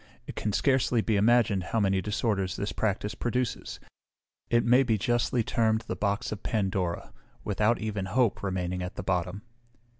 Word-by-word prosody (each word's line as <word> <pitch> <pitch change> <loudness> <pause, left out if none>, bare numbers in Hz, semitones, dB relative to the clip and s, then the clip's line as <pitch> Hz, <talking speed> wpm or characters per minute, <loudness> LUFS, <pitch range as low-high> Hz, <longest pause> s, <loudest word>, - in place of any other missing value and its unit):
It - - -8
can 105 - -2
scarcely 130 0 +2
be 110 0 0
imagined 110 -1 +3
how 115 - -1
many 95 -2 +2
disorders 105 -2 -1
this 100 +1 -3
practice 105 0 -1
produces; 120 +1 -3 0.7
it 120 0 +3
may 125 +3 +5
be 115 -5 +1
justly 120 +2 +1
termed 110 0 +1
the 115 - -5
box 100 0 -1
of 110 - -5
Pandora, 95 -5 -2 0.3
without 105 +3 +1
even 105 -3 -3
hope 115 +3 +1
remaining 90 -2 -2
at 90 0 -5
the - - -5
bottom." 90 +2 -2
105 Hz, 160 wpm, -28 LUFS, 95-115 Hz, 0.7 s, may